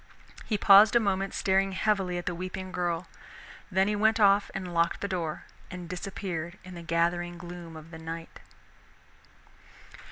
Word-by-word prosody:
He 215 - +1
paused 205 +2 +7
a - - +7
moment, 195 -2 0
staring 195 0 +2
heavily 190 -2 0
at 175 - -5
the 180 - -1
weeping 185 +2 -6
girl, 175 -1 -1 0.6
then 190 0 +2
he 210 - +1
went 220 +1 +3
off 200 -1 +5
and 185 -2 -5
locked 170 0 +1
the 200 - -1
door 170 -5 -3 0.3
and 180 -2 -7
disappeared 180 -1 -5
in 185 0 -10
the 170 - -8
gathering 170 +1 0
gloom 175 -1 -9
of 160 +1 -12
the 160 - -9
night. 165 +1 -7
180 Hz, 160 wpm, -28 LUFS, 170-195 Hz, 0.6 s, paused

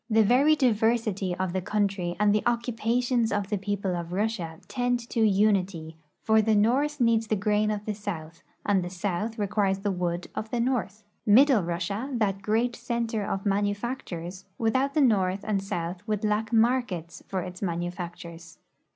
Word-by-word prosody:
The 220 0 +5
very 270 +8 +5
diversity 220 -7 +1
of 185 -1 -2
the 190 - -1
country 195 -3 -1
and 210 -1 +4
the 210 - +2
occupations 235 0 0
of 205 -1 -1
the 210 - 0
people 195 -2 -2
of 170 0 -5
Russia 185 -5 -2
tend 245 -2 -1
to - - -1
unity, 195 -6 +2 0.3
for 220 0 +4
the 220 0 +2
north 270 +8 +2
needs 230 -2 +3
the 215 - +1
grain 210 +1 +1
of 210 -1 -3
the 215 - -2
south, 170 -6 -6 0.2
and 195 -3 +2
the 175 - -4
south 200 +4 -3
requires 200 -2 +1
the 205 0 0
wood 175 -1 -2
of 220 - -4
the 240 - -2
north. 220 -5 -1 0.2
Middle 250 +2 +6
Russia, 175 +8 -3
that 200 -5 0
great 225 +4 0
center 235 -3 -2
of 195 0 -3
manufactures, 200 -3 -2
without 260 +5 +1
the 305 - +4
north 195 -6 +2
and 205 -3 0
south 175 -2 -4
would 210 -1 -1
lack 215 +1 0
markets 225 -8 +1
for 190 -1 -2
its 180 0 -8
manufactures. 175 -1 -5
210 Hz, 170 wpm, -27 LUFS, 185-230 Hz, 0.3 s, Middle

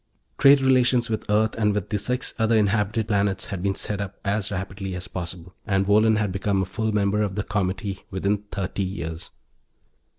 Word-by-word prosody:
Trade 140 0 +7
relations 125 -2 +3
with 110 - -3
Earth 110 +1 +3
and 105 -2 +2
with 105 -1 -2
the 105 - 0
six 125 +5 -2
other 110 0 +3
inhabited 105 +1 +1
planets 100 -2 +1
had 90 - -4
been 100 0 0
set 100 0 -3
up 100 -1 -6
as 100 0 0
rapidly 95 0 -4
as 90 0 -6
possible, 90 0 -6
and 95 -2 +1
Wohlen 110 +2 +4
had 105 -3 0
become 95 0 0
a - - -3
full 110 +4 -2
member 105 0 +1
of 100 -3 -1
the 105 - -1
Comity 95 -1 -2
within 100 +2 0
thirty 100 0 -3
years. 85 -4 -4
100 Hz, 190 wpm, -24 LUFS, 95-110 Hz, -, Trade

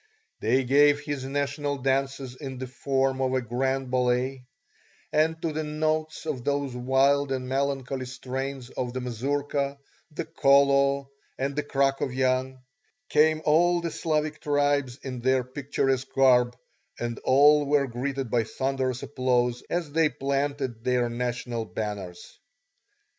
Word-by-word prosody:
They 130 +5 +2
gave 145 +3 +5
his 145 -3 -4
national 145 +1 -2
dances 135 -1 -1
in 135 -1 -7
the 130 - -4
form 135 +1 -1
of 130 0 +1
a 130 - +1
grand 130 +2 -1
ballet, 125 +1 0 0.7
and 160 +1 +2
to 165 -2 -1
the 155 +1 -2
notes 155 +1 -2
of 140 -6 -3
those 140 -2 -1
wild 135 +3 +2
and 130 -1 -2
melancholy 135 -1 -2
strains 130 0 -5
of 125 -2 -4
the 130 - -2
mazurka, 140 +3 -2 0.3
the 160 +1 -5
kolo, 140 -2 +3 0.3
and 135 +1 -2
the 150 - +1
krakovyan, 130 -2 0 0.5
came 155 +1 +3
all 175 +3 +4
the 170 -1 -3
Slavic 155 -1 -1
tribes 145 -3 +1
in 130 -2 -5
their 130 +1 +2
picturesque 135 0 -1
garb, 125 -2 +4 0.4
and 120 -1 -3
all 145 +2 +5
were 145 -1 +3
greeted 130 0 -3
by 120 -2 +2
thunderous 130 +1 -2
applause 125 -3 0
as 170 -4 -2
they 160 0 +3
planted 140 -4 -2
their 125 -1 +1
national 120 -1 -3
banners. 100 -5 -6
135 Hz, 135 wpm, -26 LUFS, 125-145 Hz, 0.7 s, gave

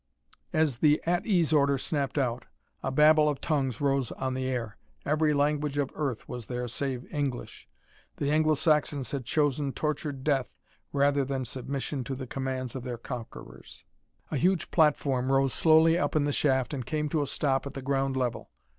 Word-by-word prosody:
As 155 -6 +1
the 150 -1 +4
"At 175 +4 0
ease" 175 -7 +2
order 140 -2 +4
snapped 140 0 -2
out 125 -3 -1 0.3
a - - -2
babel 150 +2 +5
of 145 - -2
tongues 135 -7 -1
rose 135 -3 +1
on 130 0 -3
the 130 0 -2
air. 120 -4 -3 0.3
Every 150 +1 +2
language 145 0 0
of 145 -2 0
Earth 135 -7 -3
was 120 -4 -7
there 125 0 -3
save 130 +1 -3
English. 140 -4 -4 0.5
The 145 0 0
Anglo 155 0 +3
Saxons 150 -2 +1
had 135 -4 -3
chosen 145 -1 0
tortured 150 -3 -3
death 135 -5 +1 0.4
rather 140 0 +2
than 135 -1 -3
submission 135 +2 -4
to 135 - -3
the 130 0 -6
commands 130 -1 -4
of 130 - -5
their 125 -2 -4
conquerors. 120 -1 -9 0.5
A 150 - 0
huge 180 +4 +1
platform 135 -5 +2
rose 135 -1 +3
slowly 160 +1 +5
up 145 - -1
in 150 -2 +3
the 145 - 0
shaft 135 -2 +1
and 135 -3 -3
came 150 +4 -2
to 155 +1 0
a 145 - -1
stop 135 0 0
at - - -9
the 135 - -5
ground 135 0 0
level. 125 -2 -2
140 Hz, 180 wpm, -28 LUFS, 130-150 Hz, 0.5 s, babel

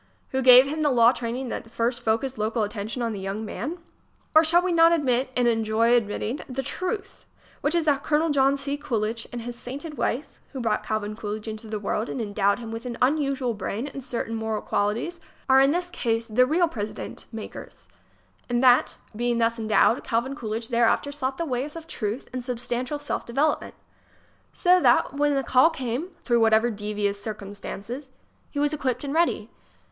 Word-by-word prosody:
who 265 - -1
gave 255 +1 +9
him 310 +2 -3
the 300 - +3
law 235 -2 +6
training 245 +1 -4
that 225 - -5
first 235 +2 -1
focused 230 +4 0
local 220 +1 0
attention 210 +3 -4
on 230 -1 -1
the 200 - -5
young 195 +3 -4
man? 255 - -4 0.6
Or, 315 +1 +7
shall 340 +2 +4
we 370 - 0
not 330 0 +6
admit 265 -6 +1
and 245 -1 +3
enjoy 225 0 +2
admitting 230 +3 0
the 265 +1 -3
truth, 390 +6 -4 0.3
which 295 +4 +1
is 340 - +2
that 285 -2 +2
Colonel 310 +1 +2
John 275 0 +3
C. 280 +1 -3
Coolidge 230 -5 -2
and 240 - -5
his 240 0 -6
sainted 280 +6 -7
wife, 270 +7 -2
who 265 - -5
brought 225 -3 0
Calvin 215 -1 -2
Coolidge 215 0 -5
into 220 0 -6
the 215 0 -3
world 210 +2 -2
and - - -4
endowed 205 -2 +1
him 230 -2 -7
with 225 +2 -6
an 235 -1 -5
unusual 275 -2 +1
brain 205 +3 -4
and 275 -1 -8
certain 235 -2 -4
moral 220 -1 -2
qualities, 230 +12 -1 0.3
are 265 0 +6
in 270 - +5
this 350 +3 -1
case 230 -6 -1
the 250 +3 +3
real 340 +4 +3
president 215 -9 -6
makers; 220 -2 -9 0.6
and 240 +1 +1
that, 250 -1 +5 0.2
being 240 +1 0
thus 230 0 +1
endowed, 220 +2 +3
Calvin 235 +4 -1
Coolidge 225 -3 -4
thereafter 235 +4 +2
sought 270 -2 -3
the 335 - -2
ways 275 +2 -3
of 330 -1 -8
truth 220 -4 -4
and 255 -1 -4
substantial 245 +2 -3
self 290 0 -3
development, 275 +6 0 0.8
so 365 0 +4
that - - +4
when 290 0 +2
the 270 - +1
call 260 +5 +5
came, 265 0 -3 0.2
through 240 -2 +2
whatever 225 +1 +4
devious 205 -1 -2
circumstances, 210 +5 -7 0.4
he - - -9
was 290 +1 +1
equipped 260 -4 -2
and 280 -1 -3
ready? 315 -9 +1
245 Hz, 190 wpm, -25 LUFS, 225-280 Hz, 0.8 s, gave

